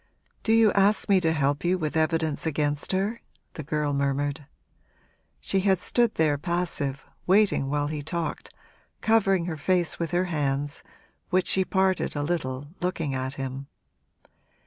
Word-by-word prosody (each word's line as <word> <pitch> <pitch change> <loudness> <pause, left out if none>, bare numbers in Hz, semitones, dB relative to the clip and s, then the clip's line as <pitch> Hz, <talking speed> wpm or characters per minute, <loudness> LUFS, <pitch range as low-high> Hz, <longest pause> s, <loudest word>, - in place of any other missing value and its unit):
'Do 220 - 0
you 225 -2 +5
ask 200 +1 +3
me 195 -2 +5
to 165 -2 +2
help 145 -2 0
you 180 +2 +2
with 155 -3 -3
evidence 160 -1 0
against 145 -1 -1
her?' 200 +5 -1 0.3
the - - -6
girl 150 0 -1
murmured. 140 0 -1 0.9
She 195 - 0
had 190 0 +3
stood 235 +5 +1
there 150 -3 +2
passive, 165 -5 -2 0.2
waiting 190 -7 +3
while 145 0 0
he 150 0 -3
talked, 165 +2 -4 0.5
covering 195 -5 +3
her 165 -3 -4
face 175 +3 +1
with 170 -1 -2
her 175 +2 +1
hands, 145 -3 -1 0.5
which 185 0 +2
she 190 - +3
parted 190 -2 0
a 145 - -1
little, 145 -5 -2 0.2
looking 165 -5 -2
at 130 +1 -3
him. 135 0 -5
160 Hz, 150 wpm, -26 LUFS, 145-185 Hz, 0.9 s, you